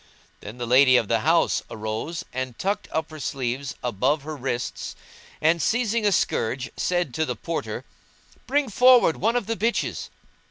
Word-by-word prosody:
Then 105 +4 -9
the 120 - -3
lady 130 +1 +6
of 110 - 0
the - - +3
house - - +2
arose 110 +10 -4
and 130 -2 -4
tucked 200 +2 -2
up 160 0 -2
her 155 - -9
sleeves 135 -1 -3
above 130 +6 0
her 155 +1 -5
wrists 125 -3 -4 0.4
and, 165 +2 +3
seizing 225 0 +1
a - - +3
scourge, 130 -7 0
said 175 -7 -1
to 160 - 0
the 125 -5 -2
Porter, 165 +9 -4 0.6
"Bring 285 0 +1
forward 245 -5 +5
one 225 +4 +1
of 245 - 0
the 225 +2 -2
bitches." 230 +4 -1
150 Hz, 165 wpm, -24 LUFS, 125-205 Hz, 0.6 s, lady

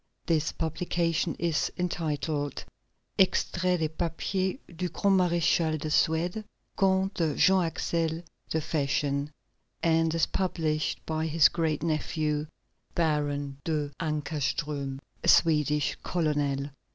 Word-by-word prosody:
This 155 -2 +1
publication 165 0 -1
is 170 -3 0
entitled: 155 -5 -2 0.5
Extraits 180 -2 +2
des 160 - +2
papiers 180 +5 -2 0.2
du 180 +2 -2
grand 195 +4 +2
maréchal 170 -3 +2
de 155 +1 -4
Suède, 170 +7 +1 0.3
Comte 190 -4 +1
Jean 190 0 +5
Axel 165 0 -1 0.3
de 160 - 0
Fersen, 145 -2 0 0.5
and 165 -1 +3
is 165 - +3
published 160 -5 -1
by 160 0 -1
his 160 -1 +5
great 160 -3 -1
nephew, 155 -1 -1 0.5
Baron 145 -4 0
de 150 -3 -1
Kinckowstrom, 145 -2 -2 0.2
a - - -2
Swedish 150 -2 +4
colonel. 145 -4 -1
160 Hz, 105 wpm, -28 LUFS, 150-170 Hz, 0.5 s, Jean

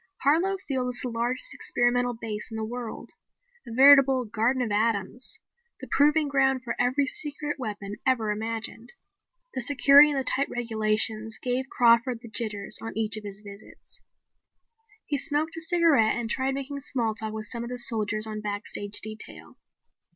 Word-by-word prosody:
Harlow 340 +8 +2
Field 260 -3 -1
was 250 -1 +3
the 250 - -3
largest 240 +2 -1
experimental 245 0 0
base 220 -2 -5
in 225 - -7
the 220 - -3
world, 235 +1 -7 0.6
a - - -8
veritable 270 0 +6
garden 230 +4 0
of 225 - -3
atoms, 225 - -1 0.4
the - - -9
proving 300 +1 +3
grounds 270 -2 +1
for 235 - -4
every 255 +3 +2
secret 295 +2 -4
weapon 205 -3 -6
ever 245 -5 +1
imagined. 225 +2 -4 0.6
The 260 - -3
security 285 +3 +6
and 285 -2 -1
the - - -2
tight 275 +2 0
regulations 220 -1 +1
gave 255 +1 -2
Crawford 235 0 +3
the 230 - -10
jitters 210 -3 -2
on 225 - -7
each 220 -1 +2
of 215 - -7
his 200 0 -8
visits. 200 0 -9 1.0
He 285 -2 -2
smoked 305 +3 -1
a - - -4
cigarette 325 -9 +3
and 235 -1 -2
tried 265 +1 0
making 275 +1 -5
small 240 -5 -1
talk 220 0 -3
with 215 0 -5
some 235 +2 -2
of 235 - -6
the 250 - -5
soldiers 215 -3 +2
on 215 -1 -6
backstage 205 0 -3
detail. 215 0 -7
240 Hz, 165 wpm, -26 LUFS, 220-270 Hz, 1.0 s, veritable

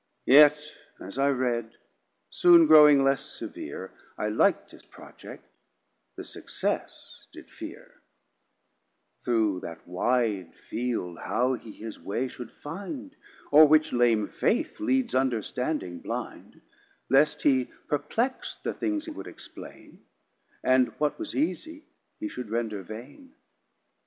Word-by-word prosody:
Yet 150 +2 +7 0.4
as 100 +8 -8
I 140 +1 +3
read 120 -4 -1 0.5
soon 170 -2 +6
growing 150 -3 +8
less 135 0 +2
severe, - - -8 0.2
I 105 - -1
lik'd 105 - +1
his - - -16
Project, - - -13 0.7
the - - -7
success - - -5
did - - -14
fear; - - -11 1.2
Through 110 -6 +1
that 85 -1 -9
wide 100 -1 -1
Field 115 -8 -4
how 125 +2 0
he 115 -3 -7
his 110 +1 -9
way 120 +6 -2
should 125 -2 -9
find 260 - -8 0.4
O're 155 +2 +9
which 155 +1 +3
lame 120 -3 +3
Faith 305 +8 -1
leads 265 -5 0
Understanding 125 - -1
blind; - - -7 0.5
Lest 145 +3 +3
he 130 -3 +3 0.2
perplex'd 220 - -2
the - - -2
things 315 -1 -2
he 325 - -6
would 305 - -8
explain, - - -12 0.6
And 130 -1 +4
what 150 -1 0
was 330 -2 -5
easie 310 +1 -2 0.3
he 320 - -3
should 125 - -7
render 110 -3 -2
vain. 130 - -11
130 Hz, 120 wpm, -27 LUFS, 115-160 Hz, 1.2 s, O're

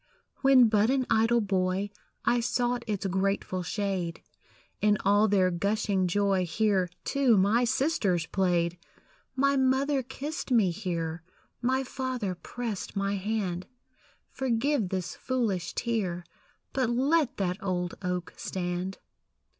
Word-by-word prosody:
When 265 -3 +7
but 215 0 +3
an 265 -1 +2
idle 225 +1 +4
boy, 190 0 0 0.3
I 240 - +3
sought 245 +1 0
its 205 -2 -2
grateful 190 -1 0
shade; 185 -3 -3 0.6
In 210 0 +4
all 205 +2 +5
their 190 -3 +3
gushing 200 +1 0
joy 195 0 +2
Here, 190 0 +1
too, 270 -6 +3
my 210 +6 +3
sisters 230 - +1
played. 175 -2 0 0.6
My 275 +1 +3
mother 265 +1 +2
kissed 285 +5 -6
me 220 -8 +4
here; 170 -3 -3 0.4
My 260 +2 +1
father 255 -6 -3
pressed 220 +3 -5
my 195 0 0
hand 195 -3 -2 0.6
Forgive 260 -3 0
this 185 -2 -3
foolish 215 -9 -2
tear, 195 -7 -1 0.5
But 260 -3 +1
let 275 +4 +2
that 190 +1 -1
old 180 -2 -1
oak 180 -2 -3
stand. 180 +1 -3
205 Hz, 120 wpm, -28 LUFS, 185-245 Hz, 0.6 s, When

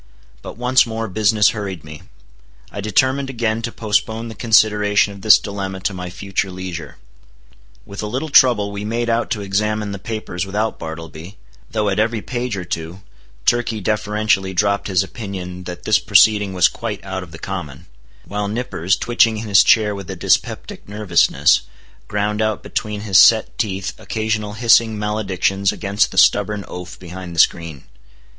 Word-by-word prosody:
But - - -9
once 125 +1 +3
more 115 0 -3
business 105 +1 +3
hurried 100 -6 -5
me. 75 -1 -10 0.7
I 100 - -5
determined 130 +7 +1
again 115 -3 -1
to 115 0 -4
postpone 110 +1 -1
the - - -7
consideration 105 -3 +3
of 100 - -12
this 110 +1 +7
dilemma 95 -2 -5
to 100 - -1
my 90 -1 -6
future 95 +1 -3
leisure. 90 -3 -7 0.9
With 100 - -7
a 105 - -3
little 130 +9 -3
trouble 120 -7 +4
we 100 0 -5
made 115 +2 -1
out 115 +1 0
to 105 - -2
examine 105 +1 -1
the 100 - -6
papers 105 -4 -4
without 105 +3 -2
Bartleby, 80 +3 -8 0.3
though 105 -2 -1
at 100 0 0
every 110 0 0
page 120 -3 -3
or 90 - -5
two, 85 +3 -6 0.4
Turkey 120 -2 +1
deferentially 105 -2 0
dropped 100 +1 +1
his 95 -1 +2
opinion 95 -5 -7
that 90 -1 -7
this 110 - +3
proceeding 105 0 +4
was 90 0 +5
quite 110 -3 -6
out 95 -1 -4
of 90 - -10
the - - -10
common; 70 -2 -6 0.4
while 105 0 -3
Nippers, 100 -5 -1
twitching 115 -2 +2
in 110 +1 -5
his 100 -2 +6
chair 105 -2 +4
with 100 -2 -8
a 95 - -4
dyspeptic 90 - -1
nervousness, 100 -5 +3 0.5
ground 105 +1 -1
out 110 -1 -1
between 105 -2 -4
his 100 -5 +4
set - - +5
teeth 95 -3 -2
occasional 110 -1 -2
hissing 115 -1 +3
maledictions 100 -2 0
against 100 0 0
the - - -10
stubborn 105 0 +3
oaf 90 0 -8
behind 90 -1 -9
the - - -2
screen. 80 -5 +1
105 Hz, 165 wpm, -19 LUFS, 95-110 Hz, 0.9 s, this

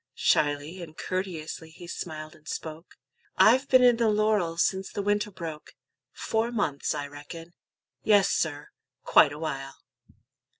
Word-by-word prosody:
Shyly 145 +4 +1
and 160 -2 -10
courteously 165 -4 -4
he 170 +2 -12
smiled 155 -3 -6
and 155 - -20
spoke; 160 +2 -7 0.4
"I've 245 +8 +5
been 255 -1 +6
in 245 -2 +6
the 230 -2 +2
laurel 210 -6 +1
since 190 +2 0
the 200 - -3
winter 205 +1 +1
broke; 165 -6 -8 0.4
Four 225 +1 -1
months, 155 -12 -1
I 145 -1 -3
reckon; 145 +4 -10 0.5
yes, 205 -3 +4
sir, 150 -2 -1 0.3
quite 145 - +6
a 145 - -7
while." 135 -3 -5
170 Hz, 140 wpm, -27 LUFS, 155-205 Hz, 0.5 s, been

